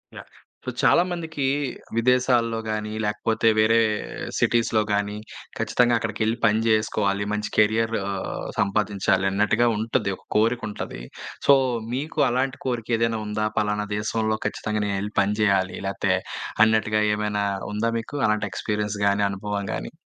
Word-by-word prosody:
Yeah! - - -10 0.4
So, - - -2
చాలామందికి 170 -5 +1 0.5
విదేశాల్లో 120 -2 +2
గానీ, 105 0 -2
లేకపోతే 110 +2 0
వేరే 115 +1 +4 0.6
సిటీస్‌లో 115 -2 +2
గానీ, 105 0 -1 0.4
ఖచ్చితంగా 120 -1 +2
అక్కడికెళ్లి 110 0 -1
పని 110 -1 +3
జేసుకోవాలి. 105 -2 +1
మంచి 105 0 -2
కెరియర్ 110 +2 +3 0.7
సంపాదించాలనట్టుగా 100 +1 +2
ఉంటది, 110 -2 0
ఒక - - -25
కోరికుంటాది. 110 - -1 0.5
సో, 140 - +9 0.4
మీకు 150 +4 -3
అలాంటి 130 +2 -1
కోరికేదైనా 115 -2 0
ఉందా? 105 +1 -1
పలానా 105 0 0
దేశంలో 110 +1 -1
ఖచ్చితంగా 105 0 -3
నేనెళ్లి 100 +1 -3
పని 100 +1 0
జేయాలి 95 -3 +2
లేతే 95 - +1 0.5
అన్నట్టుగా 110 -1 +2
ఏమైనా 105 -1 -1 0.3
ఉందా 110 +3 0
మీకు 115 +6 -7
అలాంటి 105 0 0
ఎక్స్‌పీరి‌య‌న్స్ 105 +2 -2
గానీ, 100 0 +2
అనుభవం 100 +1 -3
గానీ? - - -5
110 Hz, 120 wpm, -24 LUFS, 105-115 Hz, 0.7 s, సో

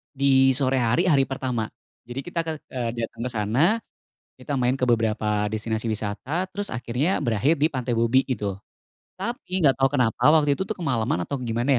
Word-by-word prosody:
Di 135 -1 +4
sore 130 0 +1
hari, 125 +8 +2
hari 140 -5 +4
pertama. 130 -4 -3 0.3
Jadi 120 +2 -6
kita 170 +4 -3
ke 160 -2 -4
eee, 120 -3 -3
datang 115 0 -5
ke 125 - -2
sana, 110 +6 +1 0.7
kita 145 - -3
main 130 +1 +1
ke 125 - +1
beberapa 105 -3 +1
destinasi 110 +1 -2
wisata 110 - -2
terus 205 +1 -2
akhirnya 125 +9 -1
berakhir 130 +5 +1
di 150 - +4
Pantai 130 -5 -3
Bobby 115 +3 +3
itu. 105 -7 -3 0.6
Tapi 190 -3 -3
enggak 135 -3 +4
tau 135 - +5
kenapa 125 -2 +2
waktu 150 -2 +5
itu 190 +7 -2
tuh 220 - -3
kemalaman 115 - -1
atau 140 +6 -4
gimana 120 +2 0
130 Hz, 180 wpm, -24 LUFS, 115-145 Hz, 0.7 s, tau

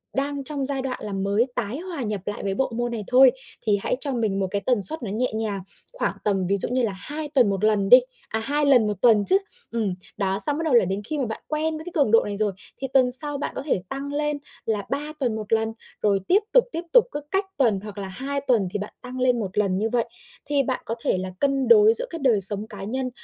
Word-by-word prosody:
đang 280 +1 -2
trong 280 -1 -3
giai 270 -1 -2
đoạn 260 -1 -4
là 205 -2 -5
mới 200 +4 +1
tái 240 +3 -3
hòa 345 -4 -6
nhập 210 -3 -3
lại 205 - -4
với 195 -1 -1
bộ 265 +1 0
môn 240 0 -1
này 225 -3 -4
thôi, 255 0 +7 0.3
thì 205 -2 +3
hãy - - 0
cho 280 -2 -3
mình 215 -5 0
một 190 - 0
cái 200 - -1
tần 245 -5 +2
suất 255 - -1
nó 200 - -4
nhẹ 240 +4 -1
nhàng, 210 -3 -2 0.3
khoảng - - -1
tầm 195 -3 0
ví 200 +2 +1
dụ - - -3
như 255 0 +1
là 220 - 0
2 295 +10 -6
tuần 255 -7 +3
1 195 +1 -2
lần 210 -2 +2
đi 250 +3 +10 0.3
à, 220 - -1
2 290 +6 0
lần 250 -6 +5
1 205 -3 -3
tuần 220 -4 +5
chứ, 380 - +5 0.3
ừm, 220 -5 -1 0.2
đó, 195 -1 0
xong 290 +5 +7
bắt - - -2
đầu 305 - +1
là 235 -6 +6
đến 195 +3 -2
khi 300 +7 -4
mà 270 - 0
bạn 220 -1 -5
quen 310 +1 -1
với 315 - -9
cái 355 - -7
cường 280 -8 +3
độ 230 - +6
này 205 -1 -4
rồi, 210 -1 +1 0.3
thì 270 - -1
tuần 255 -2 +4
sau 290 +3 -2
bạn 280 - -4
có - - -4
thể 195 -11 0
tăng 280 +1 -5
lên 295 0 -1 0.3
là 210 -3 -1
3 295 +2 -3
tuần 245 -5 0
1 215 0 -3
lần, 225 0 +1 0.3
rồi 200 -2 +2
tiếp 390 - +5
tục, - - +7
tiếp 335 - -3
tục, - - +7
cứ 295 - -4
cách 385 +1 +1
tuần 225 -8 +2
hoặc 210 -1 -9
là 195 -1 -4
2 275 +8 -4
tuần 235 -8 +2
thì 205 - -2
bạn 205 - -6
tăng 250 +1 -7
lên 250 -1 +2
1 195 -3 -5
lần 195 -3 +2
như 220 +2 0
vậy. 235 0 +1 0.4
Thì 285 -1 +1
bạn 255 0 -2
có 230 - -3
thể - - +1
là 185 0 -4
cân 275 -1 +1
đối 435 -1 +7
giữa 480 +2 +1
cái 335 - -6
đời 245 -8 +3
sống 205 +2 +3
cá 200 -2 -9
nhân 255 +5 -2
240 Hz, 275 wpm, -24 LUFS, 205-280 Hz, 0.4 s, đi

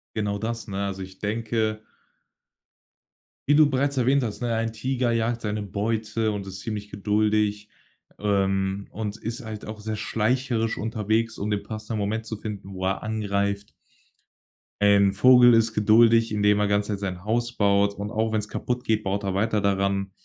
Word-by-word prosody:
Genau 105 -2 -1
das, 115 +2 -4
ne? 100 -1 -3
Also 95 -1 -4
ich 95 0 -12
denke 110 0 -1 1.7
wie 145 - +5
du 150 -1 +6
bereits 140 +1 0
erwähnt 130 +2 +3
hast, 110 -1 -4
ne, 120 -1 0
ein 115 0 -1
Tiger 125 +2 -1
jagt 115 0 0
seine 105 -1 -2
Beute 110 +2 -1
und 100 -2 -4
ist 95 0 -7
ziemlich 105 0 -5
geduldig, 105 0 0 0.5
ähm, 95 -1 0
und 105 0 -4
ist 115 +2 -5
halt 110 -2 -7
auch 110 0 -7
sehr 110 +1 -4
schleicherisch 115 +2 0
unterwegs, 110 +1 -1
um 105 +2 -2
den 105 -1 -1
passenden 110 0 -5
Moment 110 +2 -2
zu 110 -1 -5
finden, 100 -2 -7
wo 95 0 -4
er 95 0 -1
angreift. 100 -1 -2 1.1
Ein 100 -1 +5
Vogel 125 +4 +7
ist 115 -1 +3
geduldig, 115 +2 +5
indem 105 -1 +3
er 105 - +2
ganz 100 +1 +1
nett 100 -2 -2
sein 95 -3 -4
Haus 120 +3 -1
baut, 100 0 +3
und 100 +1 -5
auch 110 +1 -1
wenn's 105 -1 -1
kaputtgeht, 120 -3 -1
baut 100 +1 -2
er 95 -1 -2
weiter 110 +1 +1
daran 100 0 0
105 Hz, 170 wpm, -25 LUFS, 100-115 Hz, 1.7 s, Vogel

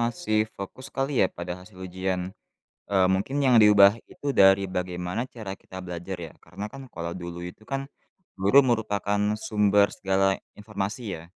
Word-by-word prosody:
masih 115 -3 0
fokus 100 +7 -8
kali 135 0 -2
ya, - - +5
pada 90 0 -6
hasil 95 +3 -16
ujian. 95 0 -3 0.6
Eee, 95 -2 +3
mungkin 100 +10 0
yang 130 -3 +5
diubah 105 -1 +7
itu 145 - -9
dari 95 -5 +5
bagaimana 90 +4 -3
cara 110 -6 -8
kita 95 0 -10
belajar, 90 +1 -6
ya. 80 -2 -7
Karena 100 +4 -8
kan 135 +3 -10
kalau 85 +1 -5
dulu 85 -1 -7
itu 90 +5 -9
kan, 135 +1 -4 0.5
guru 100 +9 +6
merupakan 105 -5 0
sumber 105 -1 +2
segala 95 0 +2 0.2
informasi 105 +3 -4 0.2
ya. 80 - -12
100 Hz, 160 wpm, -26 LUFS, 95-110 Hz, 0.6 s, diubah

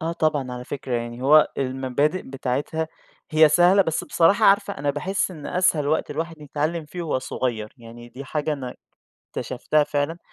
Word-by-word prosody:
آه 165 0 -2
طبعًا 150 -6 0
على 125 0 -6
فكرة 135 -1 -6
يعني، 120 +1 -4
هو 150 +3 +6
المبادئ 135 +5 0
بتاعتها 140 +5 -3 0.4
هي 155 0 +6
سهلة 175 +5 +5
بس 160 -4 -2
بصراحة 200 +6 +3
عارفة، 200 0 +3
أنا 145 +1 0
باحس 185 +8 -1
إن 155 -5 -9
أسهل 175 -5 +1
وقت 155 - 0
الواحد 165 +2 -4
يتعلّم 155 +3 -2
فيه 175 +4 -7
وهو 155 -5 -1
صغيّر، 115 -4 -3
يعني 120 0 -12
دي 130 +4 -9
حاجة 150 +3 -2
أنا 130 -4 -5 0.6
اكتشفتها 155 -1 0
فعلًا، 145 +3 -2
150 Hz, 170 wpm, -23 LUFS, 130-165 Hz, 0.6 s, هو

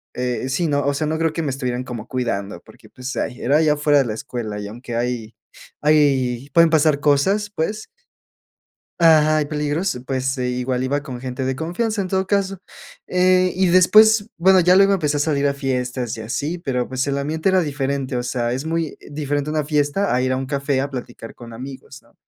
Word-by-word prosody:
eh, 125 +1 -2
sí, 165 +5 0
¿no? 145 -1 0
O 140 - +1
sea, 155 +2 -1
no 160 +1 -1
creo 165 -1 0
que 165 - -2
me 145 - -1
estuvieran 125 -2 -3
como 120 -3 -7
cuidando 115 -7 -3
porque, - - -18
pues, 130 +1 -7
ay, 125 - -3
era 140 +4 +3
ahí, 160 0 +2
afuera 150 -1 +3
de 135 - +2
la 110 - -3
escuela 110 -4 -5
y 105 - -6
aunque 120 +3 -7
hay 115 -2 -3 0.5
hay 140 -4 +2
pueden 170 -1 +6
pasar 155 -2 +3
cosas, 190 +9 +2
pues 210 +5 -3 1.1
Ajá, 155 -2 +5
hay 150 - 0
peligros. 150 +1 -2
Pues, 130 0 -2
igual 125 0 -1
iba 140 +2 -1
con 130 -4 -7
gente 130 0 -4
de 130 0 -1
confianza, 200 +8 -2
en 190 - -1
todo 190 0 0
caso, 195 -1 0 0.5
eh, 185 0 +3
y 190 0 +3
después, 210 +4 +5
bueno, 185 +2 +5
ya 180 +2 +5
luego 195 +1 +5
empecé 150 -6 0
a - - -1
salir 145 -2 +1
a 140 - -1
fiestas 125 -3 -3
y - - -8
así, 145 +10 -3
pero 130 -7 -2
pues, 130 0 -2
el 140 0 -1
ambiente 155 +5 -1
era 190 -1 +4
diferente. 140 -3 -2
O 120 - -1
sea, 120 -1 -2
es 130 +3 -3
muy 165 -1 -2
diferente 145 0 -2
a - - -3
una 155 -1 0
fiesta 150 +5 0
a 125 - +1
ir 130 - 0
a 130 - 0
un 135 - -3
café 140 -1 -1
a 140 +1 -3
platicar 120 -3 -8
con 120 -1 -12
amigos, 130 +2 -9
¿no?, - - -27
140 Hz, 215 wpm, -21 LUFS, 125-160 Hz, 1.1 s, pueden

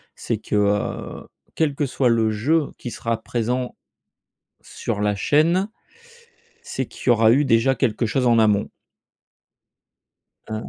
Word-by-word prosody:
C'est - - -3
que - - -4
heu, 105 0 -1 0.3
quel 150 -3 0
que 145 - 0
soit 130 -1 +1
le 115 -2 +2
jeu 145 +8 0
qui 120 - -7
sera 115 -1 -3
présent 125 +2 -2 0.9
sur 105 - -5
la 105 0 +1
chaîne, 165 - +2 0.9
c'est - - -4
qu'il - - -7
y - - +7
aura 115 -1 +5
eu 145 +4 +3
déjà 130 +1 +3
quelque 115 -2 0
chose 125 +4 0
en 115 -1 +4
amont 105 -2 +2 1.8
heu, 110 - -5
120 Hz, 140 wpm, -22 LUFS, 110-135 Hz, 1.8 s, y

